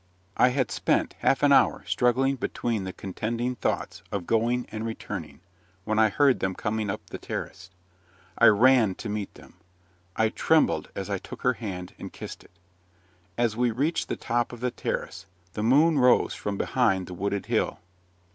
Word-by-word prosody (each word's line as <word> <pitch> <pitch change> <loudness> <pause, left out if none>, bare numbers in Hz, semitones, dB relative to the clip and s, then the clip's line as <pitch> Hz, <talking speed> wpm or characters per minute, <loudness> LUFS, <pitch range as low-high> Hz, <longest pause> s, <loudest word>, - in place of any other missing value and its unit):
I 125 - +5
had 130 -1 -1
spent - - 0
half 135 +1 +2
an 145 - +5
hour 140 - +4
struggling 130 +2 +2
between 115 -5 -2
the 95 - -4
contending 115 +7 -3
thoughts 125 - -3
of 100 -4 -3
going 120 +4 +1
and 110 0 -4
returning, 115 -5 -6 0.4
when 110 +1 0
I 110 0 +5
heard 140 +3 +3
them 95 -1 -1
coming 105 -1 -2
up - - -4
the - - -6
terrace. 90 - -6 0.7
I 115 - +6
ran 110 -2 +5
to 115 - -6
meet 105 -1 -3
them. - - -16 0.6
I 110 0 +2
trembled - - +2
as - - -4
I - - -1
took - - -10
her 125 - +3
hand, 95 -6 -6
and - - -7
kissed - - -9
it. - - -20 0.9
As 120 -2 +1
we 120 +1 +2
reached 140 +9 -1
the - - -1
top 120 0 -1
of 120 - -9
the 125 +1 -1
terrace, 95 -4 -4 0.3
the 105 - -3
moon 145 +7 +4
rose 125 -1 +4
from 100 -1 -4
behind 95 -8 +1
the 90 - -8
wooded 100 +2 -2
hill. - - 0
115 Hz, 175 wpm, -26 LUFS, 100-125 Hz, 0.9 s, I